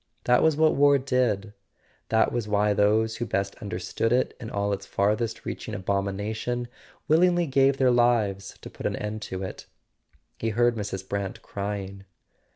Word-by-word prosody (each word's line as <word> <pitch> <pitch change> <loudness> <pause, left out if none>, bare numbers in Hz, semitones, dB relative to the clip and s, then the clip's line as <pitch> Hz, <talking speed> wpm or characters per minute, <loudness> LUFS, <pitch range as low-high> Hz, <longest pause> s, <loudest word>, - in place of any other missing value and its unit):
That 125 0 +4
was 160 -2 +3
what 155 0 +4
war 140 0 +5
did; 125 -6 0 0.6
that 110 0 +3
was 120 -3 -2
why 105 0 +2
those 110 +2 +2
who 120 - -2
best 100 -1 -1
understood 100 +3 -2
it 125 +1 +1
in 115 -4 -7
all 100 0 -1
its 100 - -5
farthest 110 +3 0
reaching - - -5
abomination 100 +5 -2 0.4
willingly 175 +2 +4
gave 135 -1 +3
their 130 -2 +4
lives 115 -5 +1
to - - -9
put - - -4
an - - -2
end 105 +1 -4
to 95 -2 -5
it. 95 - -7 0.7
He 115 - -1
heard 120 +2 +3
Mrs. 95 -3 -5
Brant 100 -1 -4
crying. 100 -1 -5
110 Hz, 165 wpm, -26 LUFS, 100-125 Hz, 0.7 s, war